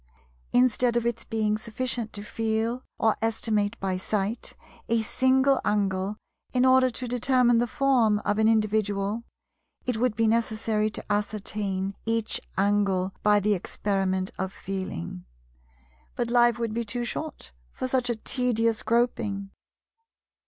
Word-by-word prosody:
Instead 245 -1 +3
of 235 - 0
its 235 -1 -2
being 215 -2 0
sufficient 230 0 -3
to 205 - -6
feel, 225 +3 -1
or 220 -1 +2
estimate 220 -1 0
by 190 -1 -1
sight, 205 +4 -2 0.3
a 230 -1 +2
single 260 +4 +3
angle 200 -1 0 0.4
in 250 0 +3
order 260 0 +5
to 250 +1 -5
determine 245 -1 +3
the 240 - +1
form 240 -5 +3
of 210 +1 +1
an 220 - +4
individual, 215 -1 +1 0.6
it 250 -3 0
would 240 -1 +1
be 225 +1 +2
necessary 220 -1 +1
to 210 - -6
ascertain 200 -2 -2
each 225 -1 -1 0.2
angle 195 -2 +1
by 210 0 +4
the 210 +1 +2
experiment 190 0 -1
of 190 0 -2
Feeling. 185 - -5 0.9
But 235 -1 -2
life 240 -1 +4
would 230 -2 -2
be 235 +1 -1
too 240 +2 -2
short 310 - -5 0.2
for - - -4
such 255 -1 +1
a 240 - +1
tedious 230 -1 +1
groping. 220 -4 0
220 Hz, 140 wpm, -26 LUFS, 205-240 Hz, 0.9 s, order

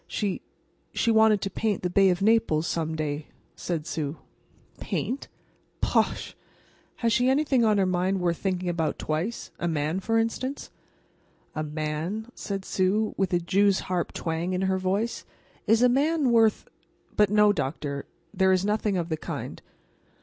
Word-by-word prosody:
"She—she 210 +2 -3
wanted 220 -2 +5
to 195 - -3
paint 210 -1 -1
the 180 - 0
Bay 195 +1 +5
of 180 +1 0
Naples 215 -8 +3
some 160 -2 -2
day," 150 -1 -3 0.3
said 165 -4 -3
Sue. 150 -2 -3 0.6
"Paint?—bosh! 265 +3 -3 0.6
Has 230 -2 +1
she 250 +1 +3
anything 270 -2 +3
on 215 -2 +3
her 195 - +3
mind 185 +1 +1
worth 170 -2 0
thinking 185 -2 -2
about 165 -3 -1
twice—a 175 +2 -3
man, 155 +2 -1
for 225 +4 0
instance?" 255 +5 -2 0.8
"A 155 - -3
man?" 155 +9 -3
said 195 -1 -5
Sue, 200 +3 +1
with 195 -2 0
a 175 - +3
jew's 195 +3 +2
harp 180 -2 -2
twang 165 +2 -2
in 185 +1 0
her 190 0 +1
voice. 195 +5 -1 0.4
"Is 225 +2 +4
a - - +7
man 280 +2 +2
worth—but, 220 -2 +1
no, 210 0 +5
doctor; 140 -2 -3 0.3
there 190 -1 +3
is 185 +1 +2
nothing 210 -1 0
of 170 -1 -2
the 160 - -1
kind." 150 - -6
190 Hz, 150 wpm, -26 LUFS, 170-220 Hz, 0.8 s, a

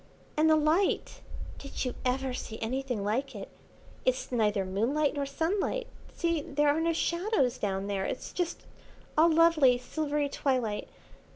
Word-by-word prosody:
"And 310 +1 +4
the 315 - +6
light! 310 +5 +1 0.4
Did 275 -1 -4
you 250 - -2
ever 260 +1 0
see 220 -3 -6
anything 250 -1 -2
like 250 +5 -1
it? 195 - -7 0.5
It's - - 0
neither 210 -5 +1
moonlight 245 +11 +1
nor 285 -1 -2
sunlight. 380 - -1 0.3
See, 335 -2 0
there 295 +1 +1
are 300 +3 +2
no 335 +1 +2
shadows 340 - 0
down 195 -1 -1
there, 200 -1 -1
it's - - -5
just 350 -2 -3 0.5
all 320 +2 +6
lovely 315 -6 +5
silvery 295 +3 -1
twilight. 250 -7 -1
280 Hz, 150 wpm, -29 LUFS, 245-320 Hz, 0.5 s, the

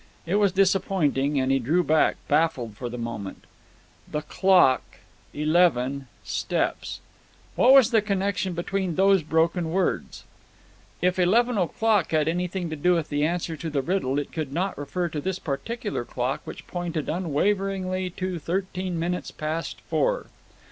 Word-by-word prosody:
It 180 +4 +1
was 205 -2 +3
disappointing, 175 -7 +2
and 130 0 +1
he 135 - +3
drew 155 +9 +2
back, 155 -1 +3
baffled 145 -8 +1
for 120 +3 -5
the 125 - -6
moment 115 -5 -6 0.7
"The 150 - -1
clock 180 -5 +4 0.5
eleven 145 -4 +2 0.2
steps." - - -2 0.5
What 255 - +5
was 265 -3 +7
the 225 -2 +4
connection 195 -2 -1
between 180 0 -2
those 195 +1 +4
broken 160 +2 +1
words? 185 +3 -1 0.8
If 180 +1 +2
eleven 225 +5 +3
o'clock 205 +1 +1
had 155 -1 +2
anything 180 +2 -1
to - - -2
do 175 +4 +2
with 165 -3 -2
the 145 0 0
answer 170 0 -1
to 165 - -4
the 140 -3 -1
riddle, 160 -6 0
it 145 - -3
could 155 -4 -4
not 185 +6 -1
refer 175 +5 -3
to 150 -2 -4
this 190 +3 -2
particular 205 - -3
clock, 125 +2 -2
which - - -9
pointed 175 -4 -4
unwaveringly 185 +2 -1
to 185 0 -4
thirteen 180 +1 -3
minutes 175 +2 -2
past 155 +2 -4
four. - - 0
175 Hz, 150 wpm, -25 LUFS, 150-190 Hz, 0.8 s, was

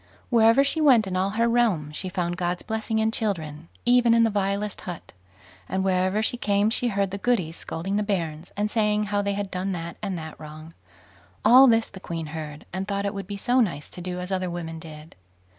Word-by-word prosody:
Wherever 230 +3 +5
she 300 +3 0
went 255 -8 +6
in 190 -1 -4
all 185 +1 +1
her 230 0 +3
realm 220 -11 +1
she 185 +5 -4
found 175 -2 -2
God's 175 0 -2
blessing 220 0 -2
in 220 0 +2
children, 165 -8 -3 0.2
even 240 -1 +5
in 230 - +5
the 225 - +2
vilest 200 0 -1
hut; 175 -3 -8 0.6
and 190 - -1
wherever 190 +2 +1
she 245 - 0
came 205 -1 +1
she 245 +1 +1
heard 200 -3 0
the 200 - -4
Goodies 190 -8 0
scolding 190 +5 -4
the - - +1
bairns, 170 -6 -3
and 210 +1 0
saying 210 -2 +2
how 205 -1 0
they 200 0 -1
had 200 -1 -4
done 190 +1 -2
that 170 -1 -6
and 195 -4 -3
that 160 -1 -8
wrong. 155 +1 -10 0.7
All 260 +2 +9
this 225 -2 +3
the 190 - -11
queen 165 -3 -5
heard, 150 -2 -7
and 190 +2 -3
thought 200 0 -2
it 200 - -1
would 195 -2 -6
be 200 0 -5
so 245 +5 +2
nice 175 - 0
to 180 - -8
do 180 0 -4
as 180 +1 -5
other 185 -1 -1
women 165 -2 -5
did. 155 0 -11
195 Hz, 220 wpm, -25 LUFS, 175-220 Hz, 0.7 s, All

